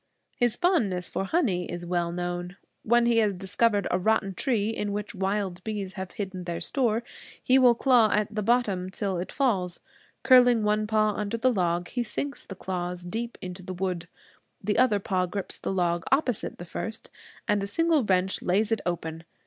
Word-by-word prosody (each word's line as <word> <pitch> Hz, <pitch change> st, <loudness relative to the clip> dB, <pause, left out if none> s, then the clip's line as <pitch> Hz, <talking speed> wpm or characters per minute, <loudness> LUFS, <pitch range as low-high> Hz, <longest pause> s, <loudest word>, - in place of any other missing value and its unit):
His 240 Hz, -3 st, +2 dB
fondness 225 Hz, -, +1 dB
for 195 Hz, -, -2 dB
honey 195 Hz, -, 0 dB
is 175 Hz, 0 st, -5 dB
well 175 Hz, -1 st, -1 dB
known. 175 Hz, +1 st, -4 dB, 0.2 s
When 240 Hz, +1 st, +3 dB
he 235 Hz, -1 st, +3 dB
has 210 Hz, -3 st, +2 dB
discovered 200 Hz, +3 st, +1 dB
a 180 Hz, -, +2 dB
rotten 195 Hz, 0 st, +1 dB
tree 220 Hz, 0 st, 0 dB
in 205 Hz, -2 st, -3 dB
which 210 Hz, 0 st, -4 dB
wild 190 Hz, -1 st, -2 dB
bees 205 Hz, -3 st, -4 dB
have 190 Hz, -2 st, -6 dB
hidden 190 Hz, -3 st, -5 dB
their 170 Hz, -1 st, -3 dB
store, 235 Hz, -4 st, 0 dB, 0.4 s
he 260 Hz, +1 st, +5 dB
will 245 Hz, -2 st, +6 dB
claw 240 Hz, -3 st, +4 dB
at 210 Hz, +1 st, 0 dB
the 215 Hz, -, -1 dB
bottom 205 Hz, -5 st, +1 dB
till 190 Hz, -1 st, -2 dB
it 180 Hz, -, -5 dB
falls. 195 Hz, -10 st, 0 dB, 0.4 s
Curling 245 Hz, -3 st, +6 dB
one 210 Hz, 0 st, +1 dB
paw 215 Hz, -1 st, +2 dB
under 210 Hz, +2 st, -3 dB
the 255 Hz, +2 st, +2 dB
log 175 Hz, -3 st, 0 dB
he 245 Hz, -, -2 dB
sinks 275 Hz, +5 st, -4 dB
the 195 Hz, -, -8 dB
claws 180 Hz, -1 st, -4 dB
deep 230 Hz, +6 st, -4 dB
into 180 Hz, 0 st, -6 dB
the 185 Hz, 0 st, -6 dB
wood. 180 Hz, -2 st, -3 dB, 0.5 s
The 210 Hz, +1 st, 0 dB
other 250 Hz, -5 st, +4 dB
paw 185 Hz, -2 st, -1 dB
grips 200 Hz, +2 st, -2 dB
the -, -, -3 dB
log 175 Hz, -2 st, 0 dB
opposite 270 Hz, -5 st, +1 dB
the 175 Hz, -, -8 dB
first, 220 Hz, +5 st, -6 dB, 0.4 s
and 210 Hz, -2 st, +2 dB
a 200 Hz, -, -2 dB
single 325 Hz, +5 st, +2 dB
wrench 190 Hz, -2 st, +1 dB
lays 205 Hz, +5 st, +1 dB
it 225 Hz, -, +1 dB
open. 165 Hz, -2 st, -3 dB
200 Hz, 190 wpm, -27 LUFS, 180-230 Hz, 0.5 s, will